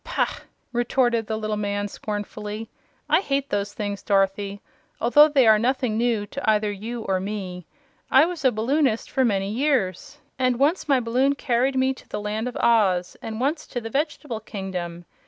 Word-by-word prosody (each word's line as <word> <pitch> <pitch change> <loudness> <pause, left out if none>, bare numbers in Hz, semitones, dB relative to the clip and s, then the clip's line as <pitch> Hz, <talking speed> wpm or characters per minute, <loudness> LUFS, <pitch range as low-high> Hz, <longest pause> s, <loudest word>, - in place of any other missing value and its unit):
Pah!" - - -1 0.3
retorted 240 -2 +1
the 220 - -2
little 215 -1 -2
man, 205 0 -1
scornfully. 210 +1 -5 0.4
"I - - +4
hate 280 -6 -2
those 205 0 -1
things, 205 -2 -3
Dorothy, 195 0 0 0.4
although 295 +6 +6
they 275 -4 +4
are 215 -1 +6
nothing 250 -1 0
new 230 -2 +1
to 260 +3 -3
either 210 -1 +2
you 225 +4 -5
or 190 -2 0
me. 185 -3 -5 0.4
I 270 +4 +6
was 345 -3 -5
a 260 - +5
balloonist 240 +2 0
for 265 - +2
many 200 -4 +1
years, 255 - 0 0.2
and 255 -2 +2
once 300 +8 +1
my 270 -2 +5
balloon 255 +4 +1
carried 260 0 +1
me 260 0 +2
to - - -17
the - - -3
Land 210 +3 -3
of 250 - -5
Oz, 190 -6 +2
and 220 0 -5
once 295 +5 -1
to 245 - -4
the 225 -1 -7
Vegetable 290 -4 -2
Kingdom. 180 -5 -6
225 Hz, 175 wpm, -24 LUFS, 205-260 Hz, 0.4 s, although